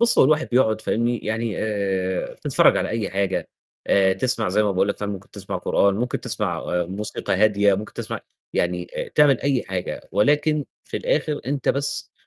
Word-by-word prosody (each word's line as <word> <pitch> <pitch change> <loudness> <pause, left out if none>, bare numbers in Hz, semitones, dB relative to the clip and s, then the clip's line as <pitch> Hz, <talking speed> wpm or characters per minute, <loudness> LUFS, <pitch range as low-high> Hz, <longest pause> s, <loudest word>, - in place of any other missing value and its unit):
بُص، 235 0 +4
هو - - +8
الواحد 150 +3 +2
بيقعُد 110 -3 +2
فاهمني، 115 +2 0
يعني 110 0 -2
آآ، 95 -3 -1
تتفرّج - - +3
على - - 0
أي 115 -1 -2
حاجة 95 0 -1 0.4
آآ، 95 -1 +4
تسمع 115 -1 0
زي 100 +3 +2
ما 105 - +1
باقول 95 +2 +1
لك 100 - -1
فاهم، 105 -1 -3
ممكن 100 -1 -8
تسمع 100 -2 -5
قرآن، 100 -1 +2
ممكن 120 +4 -2
تسمع - - -2
آآ، 90 0 -1
موسيقى 100 +4 -3
هادية، 100 -2 +4
ممكن 105 +3 -5
تسمع - - -5 0.3
يعني 90 0 -1
آآ، - - -3
تعمل 145 -4 +4
أي 135 -3 +1
حاجة 95 -1 -5
ولكن 145 +8 +2 0.2
في - - -6
الآخِر 315 - 0
أنت 135 -1 -2
بس 140 +1 -1
105 Hz, 185 wpm, -23 LUFS, 100-130 Hz, 0.4 s, هو